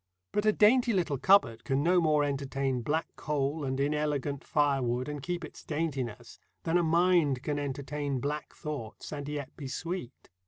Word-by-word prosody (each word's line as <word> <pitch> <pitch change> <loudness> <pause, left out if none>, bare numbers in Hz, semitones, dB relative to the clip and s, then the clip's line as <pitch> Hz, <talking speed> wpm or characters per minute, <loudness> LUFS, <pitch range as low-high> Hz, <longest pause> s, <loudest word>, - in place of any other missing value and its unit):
But 210 +1 0
a - - +7
dainty 235 +3 +4
little 165 -8 0
cupboard 190 - +4
can 135 +1 0
no 175 +2 +4
more 155 -2 +3
entertain 135 -2 -1
black 155 +7 -2
coal 145 +1 -1
and 130 -1 -2
inelegant 145 -1 0
firewood 130 -4 +1
and 150 -1 -4
keep 175 +2 -3
its - - -12
daintiness 135 -7 -3 0.2
than 170 +1 +2
a - - +3
mind 165 -5 +3
can 145 -1 -1
entertain 140 0 -3
black 145 +3 -4
thoughts 140 -8 -6
and 145 -1 -5
yet 145 -2 -5
be 140 - -6
sweet. 165 -2 -5
145 Hz, 165 wpm, -30 LUFS, 135-165 Hz, 0.2 s, a